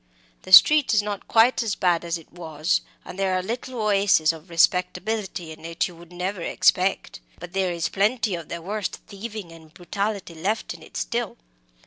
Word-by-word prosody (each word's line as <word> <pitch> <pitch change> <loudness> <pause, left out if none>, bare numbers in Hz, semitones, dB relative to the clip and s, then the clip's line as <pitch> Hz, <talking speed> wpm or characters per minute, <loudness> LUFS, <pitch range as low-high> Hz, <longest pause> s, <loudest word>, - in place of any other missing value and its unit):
The 185 - -12
street 290 +5 +8
is 210 - +3
not 205 -1 -5
quite 230 +4 +4
as 220 -4 -1
bad 175 -3 +1
as 170 0 -2
it 165 - -17
was; 160 -1 -1 0.2
and 190 - -9
there 190 -1 +1
are 185 - -1
little 240 +4 -5
oases 200 -6 +3
of 160 +2 -13
respectability 180 +1 0
in 160 0 -12
it 165 +1 -2
you 175 - -12
would 170 +1 -15
never 180 +1 -4
expect. 185 +3 +1 0.2
But 175 +1 -10
there 190 -2 0
is 170 -2 -1
plenty 210 +1 0
of 170 -3 -6
the 170 -1 -6
worst 205 +2 -3
thieving 210 -3 -8
and 160 -1 -15
brutality 200 +2 -4
left 195 +7 -2
in - - -14
it - - -10
still. - - -3
185 Hz, 185 wpm, -24 LUFS, 170-210 Hz, 0.2 s, street